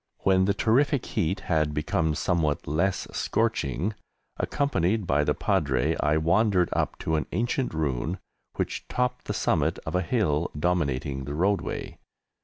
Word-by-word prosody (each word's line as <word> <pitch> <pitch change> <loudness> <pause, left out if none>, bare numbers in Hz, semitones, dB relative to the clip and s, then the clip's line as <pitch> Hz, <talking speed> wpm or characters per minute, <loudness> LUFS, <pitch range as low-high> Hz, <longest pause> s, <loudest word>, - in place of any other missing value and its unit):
When 95 -1 +4
the 100 +1 +1
terrific 130 +5 +2
heat 95 -2 -1
had 75 -3 0
become 75 +1 0
somewhat 80 -4 0
less 90 +6 0
scorching, 100 +9 0 0.4
accompanied 110 - 0
by 75 -2 +2
the - - +1
Padre, 65 -5 +1
I 75 +1 +2
wandered 90 +3 +3
up - - -1
to 80 0 0
an 75 - -2
ancient 120 +6 0
ruin 80 +2 -1 0.4
which - - -3
topped 125 0 -1
the - - -2
summit - - +1
of - - -4
a 90 - +2
hill 85 -5 +1
dominating 70 -5 -1
the 70 +1 -4
roadway. 100 +5 -1
85 Hz, 145 wpm, -26 LUFS, 75-100 Hz, 0.4 s, When